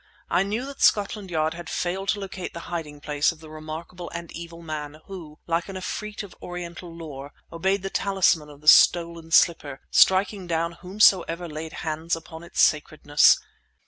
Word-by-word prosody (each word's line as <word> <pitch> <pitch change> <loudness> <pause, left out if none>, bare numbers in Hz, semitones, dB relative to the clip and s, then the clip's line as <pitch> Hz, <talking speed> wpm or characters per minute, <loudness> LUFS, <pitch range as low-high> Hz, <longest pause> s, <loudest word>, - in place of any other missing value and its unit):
I - - +3
knew 210 +6 -2
that 280 0 -9
Scotland 205 -1 +2
Yard 160 -1 0
had 170 -1 -8
failed 190 +2 -2
to 210 - +1
locate 190 -3 -6
the 170 - -6
hiding 150 -4 -5
place 145 +1 +1
of 165 - -14
the 155 -1 -13
remarkable 160 +3 -8
and 170 -1 -6
evil 170 0 -9
man 155 -1 -6
who, 165 -6 -10
like 170 +2 -1
an 195 - -7
efreet 210 +3 -5
of 200 - -11
Oriental 175 0 -7
lore, 145 -4 -9 0.2
obeyed 190 +3 0
the 195 - -4
talisman 185 -6 +2
of 145 0 -14
the 150 - -15
stolen 170 0 +5
slipper, 150 -5 +3
striking 190 0 +4
down 165 0 0
whomsoever 180 -1 +2
laid 155 0 -7
hand 160 +2 -1
upon 165 0 -10
its 170 - -7
sacredness. 150 -1 +4
170 Hz, 175 wpm, -25 LUFS, 155-185 Hz, 0.2 s, stolen